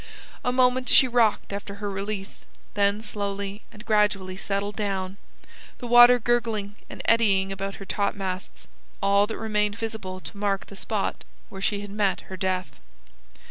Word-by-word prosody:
A 250 Hz, -, +1 dB
moment 255 Hz, 0 st, +2 dB
she 260 Hz, -, +7 dB
rocked 230 Hz, -4 st, +2 dB
after 200 Hz, 0 st, -5 dB
her 205 Hz, 0 st, -5 dB
release, 195 Hz, 0 st, -5 dB, 0.3 s
then 200 Hz, +1 st, +1 dB
slowly 200 Hz, -1 st, -4 dB
and 210 Hz, +2 st, -13 dB
gradually 210 Hz, -4 st, +1 dB
settled 200 Hz, +1 st, -2 dB
down, 195 Hz, -2 st, -2 dB, 0.6 s
the -, -, -8 dB
water 240 Hz, +1 st, +8 dB
gurgling 225 Hz, -4 st, -1 dB
and -, -, -8 dB
eddying 195 Hz, -4 st, +3 dB
about 195 Hz, 0 st, -4 dB
her 195 Hz, -, -9 dB
topmasts, 195 Hz, -2 st, -3 dB, 0.3 s
all 200 Hz, +1 st, +3 dB
that 220 Hz, -, -5 dB
remained 210 Hz, -1 st, 0 dB
visible 215 Hz, -5 st, -5 dB
to 200 Hz, -, -10 dB
mark 200 Hz, -1 st, -1 dB
the 200 Hz, -, -12 dB
spot 200 Hz, +1 st, -2 dB, 0.3 s
where 195 Hz, -, -9 dB
she 200 Hz, 0 st, 0 dB
had 205 Hz, -1 st, -8 dB
met 205 Hz, -2 st, 0 dB
her -, -, -4 dB
death. 185 Hz, -5 st, -2 dB
205 Hz, 155 wpm, -25 LUFS, 195-220 Hz, 0.6 s, water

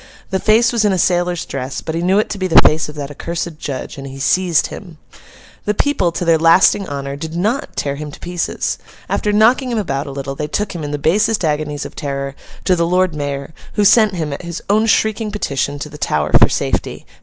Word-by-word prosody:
The 190 Hz, -, +1 dB
face 230 Hz, +4 st, +3 dB
was 230 Hz, -2 st, +2 dB
in 210 Hz, -, +3 dB
a 190 Hz, -, +1 dB
sailor's 175 Hz, -1 st, +1 dB
dress, 130 Hz, -1 st, -4 dB
but 160 Hz, -, -4 dB
he 165 Hz, -, -1 dB
knew 185 Hz, +3 st, +2 dB
it 215 Hz, -, +2 dB
to 205 Hz, -, -4 dB
be 185 Hz, -, 0 dB
the 165 Hz, -, +7 dB
face 155 Hz, 0 st, +3 dB
of 150 Hz, -, -9 dB
that 145 Hz, -1 st, -5 dB
accursed 170 Hz, +1 st, -5 dB
judge, 140 Hz, 0 st, -5 dB
and 135 Hz, -, -7 dB
he 135 Hz, 0 st, -9 dB
seized 170 Hz, +3 st, +2 dB
him. 175 Hz, -6 st, -10 dB, 0.7 s
The 210 Hz, -, 0 dB
people, 195 Hz, -12 st, +1 dB
to 175 Hz, -, -2 dB
their 165 Hz, -1 st, +4 dB
lasting 180 Hz, +4 st, +4 dB
honour, 140 Hz, -1 st, -4 dB
did 160 Hz, +3 st, -6 dB
not 215 Hz, -, -1 dB
tear 140 Hz, -1 st, -2 dB
him 150 Hz, 0 st, -6 dB
to 145 Hz, -, -12 dB
pieces. 175 Hz, -1 st, -2 dB, 0.3 s
After 210 Hz, -, 0 dB
knocking 235 Hz, +5 st, +4 dB
him 235 Hz, -, -1 dB
about 140 Hz, -9 st, -2 dB
a -, -, -5 dB
little, 135 Hz, 0 st, -5 dB
they 150 Hz, +2 st, -4 dB
took 205 Hz, +7 st, -2 dB
him, 170 Hz, -3 st, -5 dB
in 145 Hz, -, -4 dB
the 145 Hz, -, -2 dB
basest 205 Hz, +6 st, +2 dB
agonies 150 Hz, -1 st, -2 dB
of -, -, -9 dB
terror, 140 Hz, -1 st, -4 dB, 0.3 s
to 185 Hz, -, +3 dB
the 170 Hz, -1 st, +1 dB
Lord 180 Hz, 0 st, +2 dB
Mayor, 145 Hz, 0 st, -4 dB, 0.2 s
who 205 Hz, -, +2 dB
sent 215 Hz, -1 st, +5 dB
him, 155 Hz, -4 st, -2 dB
at -, -, -6 dB
his 170 Hz, -1 st, -6 dB
own 215 Hz, +2 st, +3 dB
shrieking 220 Hz, 0 st, +1 dB
petition, 145 Hz, -8 st, -2 dB
to 145 Hz, -, -5 dB
the 150 Hz, 0 st, -11 dB
Tower 75 Hz, -, 0 dB
for -, -, +6 dB
safety. -, -, -2 dB
170 Hz, 235 wpm, -18 LUFS, 145-200 Hz, 0.7 s, the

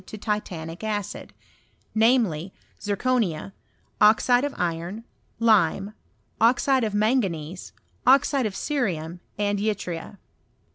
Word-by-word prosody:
225 215 Hz, -, -8 dB
to -, -, -14 dB, 0.3 s
titanic 165 Hz, +3 st, -8 dB
acid; 210 Hz, -3 st, -4 dB, 0.6 s
namely, 220 Hz, -7 st, +2 dB, 0.3 s
zirconia, 205 Hz, -5 st, -1 dB, 0.5 s
oxide 245 Hz, +4 st, +5 dB
of 290 Hz, -, -1 dB
iron, 175 Hz, +5 st, -3 dB, 0.3 s
lime, 205 Hz, -3 st, +3 dB, 0.5 s
oxide 255 Hz, +3 st, +3 dB
of 215 Hz, -2 st, -1 dB
manganese, 195 Hz, -, -1 dB, 0.4 s
oxide 270 Hz, -1 st, +4 dB
of 195 Hz, -, -7 dB
cerium, 180 Hz, -, -2 dB, 0.2 s
and 205 Hz, 0 st, 0 dB
yttria. 200 Hz, -3 st, -3 dB
210 Hz, 100 wpm, -25 LUFS, 175-230 Hz, 0.6 s, oxide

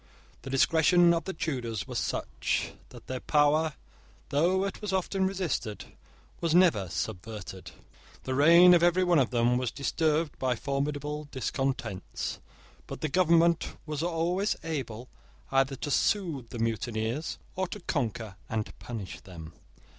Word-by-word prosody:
The 135 Hz, -, -8 dB
discretion 165 Hz, +5 st, +4 dB
of 170 Hz, -, -1 dB
the 190 Hz, -, -3 dB
Tudors 120 Hz, -, -3 dB
was -, -, -2 dB
such, -, -, -2 dB, 0.2 s
that -, -, -13 dB
their 130 Hz, -1 st, -4 dB
power, 150 Hz, +3 st, +3 dB, 0.6 s
though 175 Hz, +7 st, +2 dB
it 195 Hz, -, -5 dB
was 210 Hz, -2 st, -3 dB
often 190 Hz, 0 st, 0 dB
resisted, 175 Hz, -, -3 dB, 0.4 s
was 165 Hz, -1 st, +1 dB
never 165 Hz, -, +4 dB
subverted. 95 Hz, 0 st, -5 dB, 0.5 s
The 130 Hz, -, -2 dB
reign 170 Hz, +6 st, +8 dB
of 175 Hz, -, +5 dB
every 175 Hz, +2 st, +4 dB
one 175 Hz, -3 st, +4 dB
of 130 Hz, -, +2 dB
them 120 Hz, 0 st, +2 dB
was 125 Hz, -2 st, -1 dB
disturbed 155 Hz, +3 st, 0 dB
by 130 Hz, -1 st, +1 dB
formidable 145 Hz, +4 st, -3 dB
discontents: 130 Hz, -6 st, -3 dB, 0.5 s
but -, -, -7 dB
the 155 Hz, -, -1 dB
government 170 Hz, 0 st, +3 dB
was 150 Hz, -1 st, -3 dB
always 175 Hz, +4 st, 0 dB
able 130 Hz, -7 st, -4 dB, 0.4 s
either 135 Hz, 0 st, +2 dB
to 145 Hz, +3 st, -4 dB
soothe 155 Hz, -, 0 dB
the -, -, -7 dB
mutineers 115 Hz, +4 st, -2 dB, 0.2 s
or 185 Hz, 0 st, -1 dB
to 210 Hz, -, -7 dB
conquer 115 Hz, -, -3 dB
and 110 Hz, -1 st, -3 dB
punish 110 Hz, -6 st, -6 dB
them. 80 Hz, -3 st, -10 dB
145 Hz, 140 wpm, -29 LUFS, 120-170 Hz, 0.6 s, reign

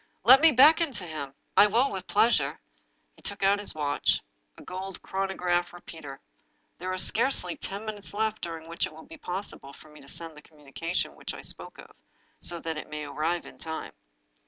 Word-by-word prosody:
" -, -, -43 dB
Let 270 Hz, +2 st, +10 dB
me 325 Hz, 0 st, +8 dB
beckon 300 Hz, +4 st, +6 dB
to 210 Hz, -, -2 dB
him 150 Hz, -5 st, -6 dB
— -, -, -45 dB
I 205 Hz, -, +9 dB
will 240 Hz, +6 st, +3 dB
with 190 Hz, -1 st, -5 dB
pleas 225 Hz, 0 st, +4 dB
ure." 140 Hz, -1 st, -3 dB, 0.6 s
He -, -, -19 dB
took 200 Hz, 0 st, -4 dB
out 200 Hz, +1 st, +4 dB
his 205 Hz, -, +1 dB
watch 145 Hz, -1 st, +1 dB, 0.2 s
— -, -, -44 dB
a -, -, -11 dB
gold 190 Hz, +1 st, -6 dB
chronograph 180 Hz, -2 st, 0 dB
repeater. 160 Hz, -5 st, -9 dB, 0.3 s
" -, -, -43 dB
There 185 Hz, +1 st, -3 dB
are 185 Hz, -, -2 dB
scarcely 210 Hz, -2 st, +3 dB
ten 200 Hz, +3 st, -4 dB
minutes 210 Hz, -2 st, -4 dB
left 220 Hz, +1 st, -1 dB
during 165 Hz, -1 st, -5 dB
which 170 Hz, +1 st, -1 dB
it -, -, -13 dB
will 160 Hz, -, -12 dB
be 325 Hz, -, -11 dB
possible 180 Hz, -, -5 dB
for 155 Hz, -, -15 dB
me 150 Hz, -1 st, -14 dB
to 140 Hz, -, -15 dB
send 165 Hz, +2 st, -5 dB
the 150 Hz, -, -12 dB
communication 155 Hz, +3 st, -4 dB
which -, -, -6 dB
I -, -, -8 dB
spoke -, -, -5 dB
of, -, -, -12 dB, 0.5 s
so 170 Hz, -1 st, -2 dB
that 160 Hz, -1 st, -3 dB
it -, -, -9 dB
may 150 Hz, 0 st, -4 dB
arrive 165 Hz, +4 st, -1 dB
in -, -, -13 dB
time. 160 Hz, -1 st, -4 dB
175 Hz, 215 wpm, -28 LUFS, 155-205 Hz, 0.6 s, Let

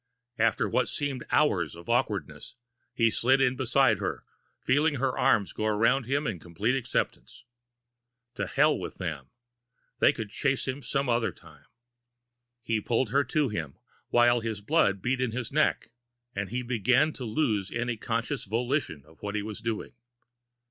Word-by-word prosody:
After -, -, +2 dB
what -, -, +1 dB
seemed 140 Hz, -4 st, -3 dB
hours -, -, +2 dB
of 85 Hz, +1 st, -12 dB
awkwardness, -, -, -1 dB, 0.4 s
he 115 Hz, -2 st, +2 dB
slid 130 Hz, +5 st, +3 dB
in 130 Hz, -1 st, +3 dB
beside 130 Hz, +1 st, +3 dB
her, -, -, -3 dB, 0.3 s
feeling 145 Hz, +4 st, +2 dB
her 130 Hz, -1 st, 0 dB
arms 100 Hz, -3 st, +2 dB
go 110 Hz, -, -2 dB
around 115 Hz, +5 st, +2 dB
him 140 Hz, +4 st, 0 dB
in 100 Hz, -6 st, -2 dB
complete 95 Hz, +10 st, -1 dB
acceptance. 125 Hz, -3 st, -3 dB, 0.9 s
To -, -, -3 dB
hell -, -, +3 dB
with -, -, -6 dB
them! -, -, -5 dB, 0.7 s
They -, -, +6 dB
could 110 Hz, -3 st, -6 dB
chase 140 Hz, +2 st, 0 dB
him 130 Hz, +2 st, -3 dB
some 135 Hz, 0 st, -1 dB
other 120 Hz, -1 st, +1 dB
time! 75 Hz, -4 st, -18 dB, 1.0 s
He 110 Hz, -1 st, 0 dB
pulled 115 Hz, +1 st, 0 dB
her 140 Hz, +2 st, +3 dB
to 150 Hz, -4 st, +1 dB
him, 80 Hz, -9 st, -5 dB, 0.3 s
while 120 Hz, 0 st, +4 dB
his 110 Hz, -2 st, -3 dB
blood 100 Hz, -, +2 dB
beat 130 Hz, +1 st, 0 dB
in 125 Hz, -3 st, -1 dB
his 125 Hz, -1 st, -4 dB
neck, 150 Hz, -5 st, +1 dB, 0.4 s
and 100 Hz, 0 st, -3 dB
he 125 Hz, +2 st, -2 dB
began 125 Hz, +6 st, +2 dB
to 130 Hz, -, -7 dB
lose 110 Hz, -5 st, 0 dB
any 120 Hz, 0 st, -1 dB
conscious 115 Hz, +5 st, -2 dB
volition 115 Hz, -, -2 dB
of 80 Hz, +1 st, -21 dB
what 105 Hz, 0 st, -4 dB
he 105 Hz, -, -1 dB
was 110 Hz, 0 st, -7 dB
doing. 115 Hz, -2 st, -3 dB
120 Hz, 160 wpm, -28 LUFS, 105-130 Hz, 1.0 s, They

